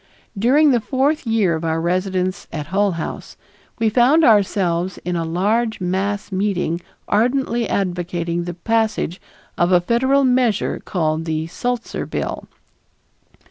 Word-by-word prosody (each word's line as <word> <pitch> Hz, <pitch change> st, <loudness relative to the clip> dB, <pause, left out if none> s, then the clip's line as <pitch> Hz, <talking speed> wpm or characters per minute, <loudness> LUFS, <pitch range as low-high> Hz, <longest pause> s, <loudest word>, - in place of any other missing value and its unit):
During 275 Hz, +9 st, +4 dB
the 245 Hz, -, +3 dB
fourth 275 Hz, +3 st, 0 dB
year 220 Hz, -6 st, +2 dB
of 160 Hz, 0 st, -3 dB
our 160 Hz, 0 st, 0 dB
residence 185 Hz, +2 st, -1 dB
at 150 Hz, -2 st, -4 dB
Hull 200 Hz, -1 st, +2 dB
House 165 Hz, -, -6 dB, 0.4 s
we 225 Hz, -, +1 dB
found 255 Hz, +8 st, +4 dB
ourselves 190 Hz, -, +2 dB
in 180 Hz, 0 st, -1 dB
a 165 Hz, -, -1 dB
large 215 Hz, +7 st, 0 dB
mass 195 Hz, +3 st, -2 dB
meeting 185 Hz, -3 st, -1 dB, 0.3 s
ardently 240 Hz, +1 st, +1 dB
advocating 175 Hz, -2 st, -2 dB
the 175 Hz, -1 st, -5 dB
passage 220 Hz, -2 st, -1 dB, 0.4 s
of 175 Hz, +1 st, +3 dB
a 180 Hz, -, +6 dB
Federal 260 Hz, +9 st, +2 dB
measure 250 Hz, -5 st, +1 dB
called 160 Hz, -3 st, -1 dB
the 160 Hz, -1 st, -2 dB
Sulzer 240 Hz, +8 st, -3 dB
Bill. -, -, -4 dB
195 Hz, 135 wpm, -20 LUFS, 175-235 Hz, 0.4 s, a